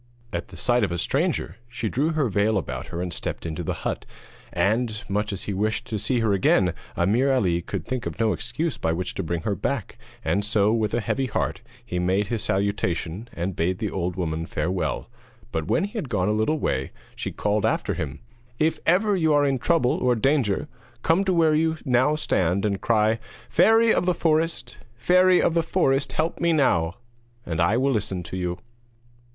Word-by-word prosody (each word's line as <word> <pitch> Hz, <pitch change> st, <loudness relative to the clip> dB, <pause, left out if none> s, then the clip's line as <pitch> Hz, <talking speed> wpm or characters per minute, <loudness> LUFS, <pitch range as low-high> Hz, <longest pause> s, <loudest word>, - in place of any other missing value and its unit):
At -, -, -3 dB
the -, -, -12 dB
sight 120 Hz, -1 st, +2 dB
of 100 Hz, -, 0 dB
a 85 Hz, -, -1 dB
stranger 85 Hz, +1 st, -1 dB
she 120 Hz, -1 st, -3 dB
drew 145 Hz, +9 st, 0 dB
her 150 Hz, -4 st, +1 dB
veil 105 Hz, +1 st, +2 dB
about 90 Hz, -, -4 dB
her 85 Hz, +1 st, -4 dB
and 90 Hz, -3 st, -4 dB
stepped -, -, -4 dB
into 80 Hz, +1 st, -3 dB
the 85 Hz, -, -4 dB
hut, -, -, -2 dB, 0.5 s
and 110 Hz, +1 st, 0 dB
much 105 Hz, +1 st, -1 dB
as 100 Hz, -, -4 dB
he 100 Hz, -, -3 dB
wished 105 Hz, +4 st, -1 dB
to 110 Hz, -, -3 dB
see 125 Hz, +3 st, 0 dB
her 110 Hz, -3 st, +2 dB
again 95 Hz, -2 st, +3 dB, 0.2 s
Ameer 115 Hz, +10 st, +3 dB
Ali 90 Hz, -10 st, +2 dB
could -, -, -5 dB
think 130 Hz, -2 st, -3 dB
of -, -, -7 dB
no 110 Hz, -2 st, +2 dB
excuse 125 Hz, +7 st, -3 dB
by 80 Hz, -, 0 dB
which 90 Hz, +2 st, -3 dB
to -, -, -3 dB
bring 85 Hz, -1 st, -2 dB
her 105 Hz, -, 0 dB
back, 105 Hz, +4 st, -3 dB, 0.3 s
and 100 Hz, -, +1 dB
so, 105 Hz, 0 st, +2 dB
with 110 Hz, -2 st, 0 dB
a 120 Hz, -, 0 dB
heavy 135 Hz, +5 st, -1 dB
heart, 110 Hz, -, -2 dB, 0.2 s
he 90 Hz, -, -3 dB
made 95 Hz, +3 st, +1 dB
his 115 Hz, -3 st, -2 dB
salutation, 100 Hz, 0 st, -1 dB
and 90 Hz, +2 st, -3 dB
bade 90 Hz, +3 st, 0 dB
the 105 Hz, 0 st, -3 dB
old 90 Hz, -1 st, -2 dB
woman 80 Hz, -2 st, -2 dB
farewell. 90 Hz, +4 st, -2 dB, 0.4 s
But 80 Hz, -1 st, -2 dB
when 170 Hz, -, +2 dB
he 200 Hz, -, -3 dB
had 195 Hz, -, -3 dB
gone 105 Hz, -3 st, +1 dB
a -, -, +2 dB
little 110 Hz, +9 st, +1 dB
way 65 Hz, -, -1 dB, 0.3 s
she -, -, -4 dB
called 105 Hz, 0 st, 0 dB
after -, -, +1 dB
him: 70 Hz, -1 st, -5 dB, 0.4 s
'If 155 Hz, +4 st, +1 dB
ever 200 Hz, +4 st, +4 dB
you 160 Hz, -4 st, +2 dB
are 145 Hz, 0 st, +4 dB
in 135 Hz, -2 st, +1 dB
trouble 160 Hz, -4 st, +2 dB
or 125 Hz, -1 st, +2 dB
danger, 120 Hz, -4 st, +1 dB, 0.4 s
come 165 Hz, +4 st, +3 dB
to 190 Hz, -, +2 dB
where 160 Hz, -2 st, +4 dB
you 160 Hz, +1 st, +1 dB
now 130 Hz, +3 st, +3 dB
stand 95 Hz, -, +1 dB
and 100 Hz, -2 st, -1 dB
cry: 110 Hz, 0 st, +2 dB, 0.3 s
"Fairy 225 Hz, +1 st, +5 dB
of 175 Hz, -, 0 dB
the 180 Hz, -, +3 dB
Forest! 155 Hz, -6 st, 0 dB, 0.2 s
Fairy 180 Hz, +8 st, +4 dB
of -, -, +2 dB
the 165 Hz, -, +3 dB
forest, 140 Hz, -5 st, +1 dB
help 160 Hz, +1 st, -1 dB
me 170 Hz, -1 st, +2 dB
now!" 90 Hz, -, +2 dB, 0.5 s
And 80 Hz, 0 st, -1 dB
I 85 Hz, +7 st, +3 dB
will 135 Hz, +2 st, +2 dB
listen 95 Hz, -6 st, -1 dB
to 80 Hz, -, -7 dB
you.' 90 Hz, -1 st, -2 dB
110 Hz, 205 wpm, -24 LUFS, 95-140 Hz, 0.5 s, Fairy